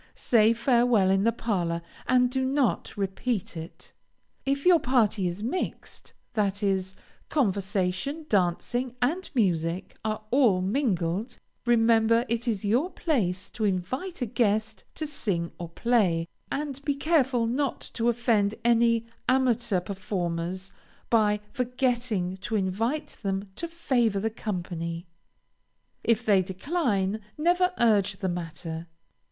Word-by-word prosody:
Say 220 -2 +4
farewell 235 -4 +3
in 195 +2 +2
the 230 - +4
parlor, 175 -8 -1 0.2
and 250 -1 +4
do 260 0 0
not 265 -5 0
repeat 200 +1 -2
it. 165 0 -9 0.5
If 275 +1 0
your 355 -2 +7
party 220 -8 +2
is 175 +4 -4
mixed, 265 +11 -4 0.2
that 205 -2 0
is, 190 -1 0 0.3
conversation, 200 - -1
dancing, 225 - 0
and 330 +10 0
music 175 -5 0
are 215 0 -2
all 240 -8 +4
mingled, 205 -1 -1 0.3
remember 230 0 +4
it 235 +1 -1
is 210 -3 -1
your 245 - +2
place 205 - -1
to 220 - -4
invite 250 - -2
a - - +1
guest 220 -1 0
to 310 - -3
sing 195 - -2
or 170 -1 -5
play, 180 -5 +1 0.2
and 280 -1 -3
be 285 -1 0
careful 275 -5 +2
not 260 +3 -1
to 235 0 +1
offend 225 -3 +2
any 230 -1 +4 0.2
amateur 240 -6 +2
performers 185 -1 -3 0.4
by 210 -2 +3
forgetting 240 -7 -1
to 195 +4 -4
invite 225 +10 -1
them 195 -1 -2
to 335 - -4
favor 250 -11 +1
the 220 +3 -1
company. 175 -5 -4 1.0
If 230 +1 +2
they 200 -3 +5
decline, 200 - -1 0.2
never 355 +4 +3
urge 210 -4 +3
the 190 -2 -2
matter. 165 -1 -5
220 Hz, 125 wpm, -27 LUFS, 190-250 Hz, 1.0 s, your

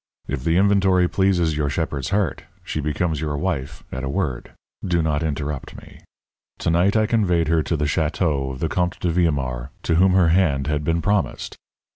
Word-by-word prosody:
If - - -3
the 85 +1 +2
inventory 95 -2 +3
pleases 90 -5 +1
your 75 -1 0
shepherd's 70 -3 -2
heart, 100 -6 -1 0.2
she - - -4
becomes 75 +1 -1
your 75 -2 -2
wife 75 -3 -3
at 65 +1 -5
a 65 - -2
word. 70 -7 -3 0.3
Do 85 -3 +1
not 75 -1 0
interrupt 75 -3 -4
me. - - -14 0.6
To - - 0
night 90 +6 +3
I 110 - +3
conveyed 90 -8 +1
her 80 -1 +3
to 80 +1 -1
the 75 - -1
château 75 -2 0
of 65 - -10
the 80 - +1
Comte 90 +2 -1
de 90 - 0
Villemaur, 70 -7 0
to 80 - +1
whom 95 +1 +4
her 90 -3 +4
hand 80 -6 +2
had 75 0 -1
been 80 +2 0
promised. 100 -3 -1
80 Hz, 190 wpm, -22 LUFS, 75-90 Hz, 0.6 s, whom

